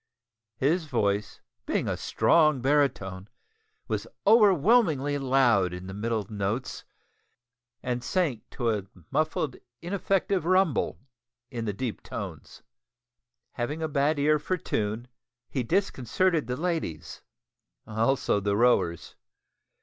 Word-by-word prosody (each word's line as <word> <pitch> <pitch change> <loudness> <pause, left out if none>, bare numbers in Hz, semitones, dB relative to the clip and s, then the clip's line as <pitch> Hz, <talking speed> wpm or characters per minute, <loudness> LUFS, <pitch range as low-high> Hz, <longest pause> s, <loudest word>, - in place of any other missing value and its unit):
His 160 +7 +1
voice, 105 -6 -1 0.3
being - - 0
a - - 0
strong 155 -4 +3
baritone, 120 -9 0 0.6
was - - -2 0.2
overwhelmingly 195 - +4
loud 125 -9 +3
in 90 +1 -7
the 95 - -7
middle 110 +1 -2
notes, 105 +3 -3 1.0
and 125 -1 -2
sank 150 - 0
into 120 -3 -1
a 100 -3 -3 0.2
muffled 155 -3 0 0.2
ineffective 190 0 0
rumble 185 -3 +2 0.5
in 115 -3 -4
the 105 - -1
deep 120 +2 -4
tones. - - -8 0.9
Having 145 +7 -3
a - - 0
bad 145 +1 +1
ear 150 +1 +3
for 185 +5 -1
tune, 110 -5 -2 0.4
he 130 - -1
disconcerted 165 - 0
the 125 0 -2
ladies 160 - -3 0.6
also 110 +1 +1
the 100 0 0
rowers. 110 -8 +2
135 Hz, 110 wpm, -27 LUFS, 110-160 Hz, 1.0 s, overwhelmingly